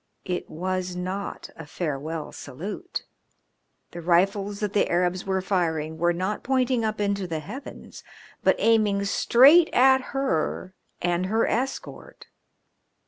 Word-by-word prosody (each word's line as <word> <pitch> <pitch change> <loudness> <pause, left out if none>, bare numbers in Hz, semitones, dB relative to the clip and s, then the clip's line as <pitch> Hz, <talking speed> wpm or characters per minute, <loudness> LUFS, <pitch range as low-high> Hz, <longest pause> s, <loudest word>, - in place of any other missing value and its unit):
It 180 -2 -3
was 185 +2 -3
not 185 +2 -5
a 165 - -10
farewell 155 0 -4
salute. 205 - -7 0.9
The 175 - -7
rifles 195 +4 +1
that 210 -2 -2
the 205 - +2
Arabs 180 +2 0
were 190 -1 0
firing 160 -5 -1
were 175 +1 +3
not 185 +4 -2
pointing 255 -2 +1
up 215 -1 -2
into 200 -2 -1
the 160 -2 -3
heavens, 225 - -10 0.4
but - - +4
aiming 210 -3 +2
straight 280 - +6
at 265 +1 +5
her 185 - -1 0.3
and 175 +1 0
her 220 +3 +2
escort. 260 +4 -4
190 Hz, 130 wpm, -25 LUFS, 175-220 Hz, 0.9 s, straight